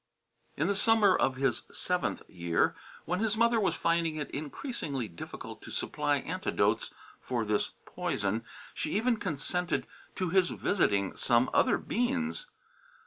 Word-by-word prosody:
In 150 Hz, -, +1 dB
the 200 Hz, +2 st, +1 dB
summer 210 Hz, -2 st, +5 dB
of 130 Hz, -, +2 dB
his 130 Hz, -3 st, +1 dB
seventh 180 Hz, 0 st, -1 dB
year, 85 Hz, -2 st, +1 dB, 0.3 s
when 180 Hz, +2 st, -1 dB
his 220 Hz, 0 st, +1 dB
mother 235 Hz, 0 st, +4 dB
was 200 Hz, -, +2 dB
finding 165 Hz, -1 st, +1 dB
it 150 Hz, -2 st, -4 dB
increasingly 145 Hz, -, -4 dB
difficult 85 Hz, -4 st, -8 dB
to -, -, -10 dB
supply -, -, 0 dB
antidotes -, -, 0 dB, 0.3 s
for 120 Hz, -3 st, -2 dB
this 105 Hz, 0 st, 0 dB
poison, 105 Hz, +2 st, -1 dB, 0.3 s
she 155 Hz, +5 st, -1 dB
even 235 Hz, +1 st, +2 dB
consented 180 Hz, 0 st, -1 dB, 0.3 s
to 185 Hz, -2 st, -1 dB
his 185 Hz, -1 st, +4 dB
visiting 100 Hz, -, +1 dB
some 120 Hz, 0 st, +3 dB
other -, -, +4 dB
Beans. 245 Hz, -, -1 dB
170 Hz, 140 wpm, -30 LUFS, -, 0.3 s, summer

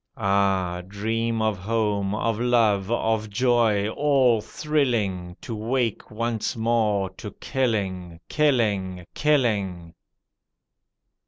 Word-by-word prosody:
Ah! 95 Hz, -4 st, +1 dB
dream 110 Hz, +3 st, -1 dB
of 110 Hz, -4 st, 0 dB
home, 105 Hz, -1 st, -1 dB
of 115 Hz, 0 st, -1 dB
love, 110 Hz, -5 st, +2 dB
of 110 Hz, -2 st, 0 dB
joy, 110 Hz, -2 st, +2 dB
all 130 Hz, -4 st, +3 dB
thrilling, 110 Hz, -11 st, -1 dB
To 115 Hz, -, -5 dB
wake 115 Hz, +1 st, -2 dB
once 115 Hz, 0 st, -2 dB
more 110 Hz, -4 st, +1 dB
to 105 Hz, +3 st, -8 dB
killing, 95 Hz, -, -2 dB
killing, 105 Hz, -, +1 dB
killing. 100 Hz, -, 0 dB
110 Hz, 95 wpm, -24 LUFS, 100-120 Hz, -, all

